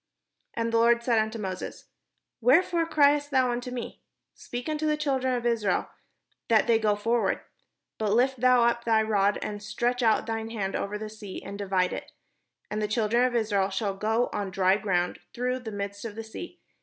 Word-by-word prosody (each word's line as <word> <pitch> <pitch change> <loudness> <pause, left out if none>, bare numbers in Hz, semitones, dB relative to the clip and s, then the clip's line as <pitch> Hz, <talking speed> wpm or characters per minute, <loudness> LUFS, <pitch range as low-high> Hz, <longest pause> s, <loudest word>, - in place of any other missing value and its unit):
And 230 0 -1
the - - +4
Lord 235 0 +4
said 235 -2 +3
unto 220 +1 -1
Moses: 190 -4 -5 0.6
''Wherefore 330 +6 +3
criest 290 -2 +4
thou 260 -3 +2
unto 245 +1 -3
me? 250 -1 -6 0.3
speak 245 +3 -7
unto 310 0 -1
the 305 0 +1
children 265 -4 0
of 240 -1 -3
Israel, 220 -6 0 0.6
that 225 -2 +4
they 230 -1 +3
go 210 -2 +2
forward. 225 0 0 0.6
But 210 -2 +1
lift 255 +2 +2
thou 250 -1 +5
up 235 0 +2
thy 225 -1 +3
rod, 205 -2 +2
and 205 -1 -5
stretch 240 +4 -1
out 225 -2 +3
thine 225 0 -3
hand 200 -4 -3
over 205 +1 -2
the 215 +1 -6
sea, 215 -3 -8
and 200 - -7
divide 190 -2 0
it; - - -7 0.6
and 210 0 -2
the 210 - 0
children 225 +2 +2
of 250 -1 -1
Israel 205 -4 +1
shall 195 +1 -1
go 220 +4 0
on 205 -2 -2
dry 190 0 +3
ground 180 -4 -1 0.2
through 250 +1 -1
the 230 -3 -7
midst 200 0 -5
of 225 -3 -6
the 225 - -5
sea. 345 +11 -9
225 Hz, 195 wpm, -27 LUFS, 205-245 Hz, 0.6 s, thou